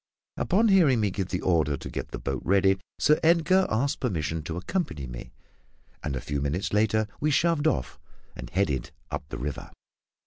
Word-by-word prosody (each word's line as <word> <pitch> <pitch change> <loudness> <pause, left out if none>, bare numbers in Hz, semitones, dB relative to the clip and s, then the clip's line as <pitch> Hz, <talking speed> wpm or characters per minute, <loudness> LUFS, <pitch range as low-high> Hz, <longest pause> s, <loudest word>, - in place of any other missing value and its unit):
Upon 215 +5 +2
hearing 165 - +5
me 105 -2 +1
give 95 0 -3
the 90 - -3
order 80 -5 +2
to - - -8
get - - -4
the - - -5
boat 70 -2 -3
ready, 95 0 +3 0.2
Sir 150 +1 +4
Edgar 170 +3 +4
asked 135 +6 0
permission 80 - -2
to 80 - -4
accompany 90 - -3
me; - - -8 0.7
and 70 -3 -2
a 65 - -3
few 70 +2 -3
minutes 75 +9 -2
later 110 0 +2
we 150 - +1
shoved 160 +1 +2
off, 65 - -1 0.4
and - - -8
headed 75 -10 0 0.2
up 75 - -5
the - - -5
river. 70 +2 -5
95 Hz, 180 wpm, -27 LUFS, -, 0.7 s, hearing